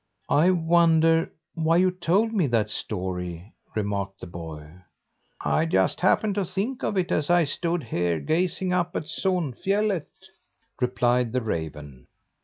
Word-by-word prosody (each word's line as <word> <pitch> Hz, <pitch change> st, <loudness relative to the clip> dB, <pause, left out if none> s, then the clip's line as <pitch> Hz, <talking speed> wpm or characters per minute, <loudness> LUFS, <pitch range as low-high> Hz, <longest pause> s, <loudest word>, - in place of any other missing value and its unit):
"I 160 Hz, +5 st, +5 dB
wonder 165 Hz, -1 st, +3 dB, 0.2 s
why 165 Hz, +1 st, +2 dB
you 185 Hz, +1 st, +4 dB
told 185 Hz, +5 st, +1 dB
me 185 Hz, -9 st, +2 dB
that 110 Hz, -4 st, +1 dB
story?" 90 Hz, -2 st, -4 dB, 0.2 s
remarked 100 Hz, -2 st, -2 dB
the -, -, -8 dB
boy. 80 Hz, -2 st, -9 dB, 0.6 s
"I 160 Hz, -, +1 dB
just 95 Hz, -, +1 dB
happened 200 Hz, +3 st, +2 dB
to 200 Hz, 0 st, 0 dB
think 210 Hz, +8 st, -3 dB
of 205 Hz, -, -1 dB
it 180 Hz, -2 st, 0 dB
as 150 Hz, +1 st, 0 dB
I 175 Hz, -1 st, +5 dB
stood 165 Hz, +2 st, -2 dB
here, 85 Hz, -6 st, -1 dB
gazing 180 Hz, -, 0 dB
up 175 Hz, -1 st, 0 dB
at -, -, -1 dB
Sonfjället," 185 Hz, -, -1 dB, 0.7 s
replied 125 Hz, -1 st, +1 dB
the 130 Hz, -, +1 dB
raven. 75 Hz, -, -5 dB
160 Hz, 140 wpm, -25 LUFS, -, 0.7 s, I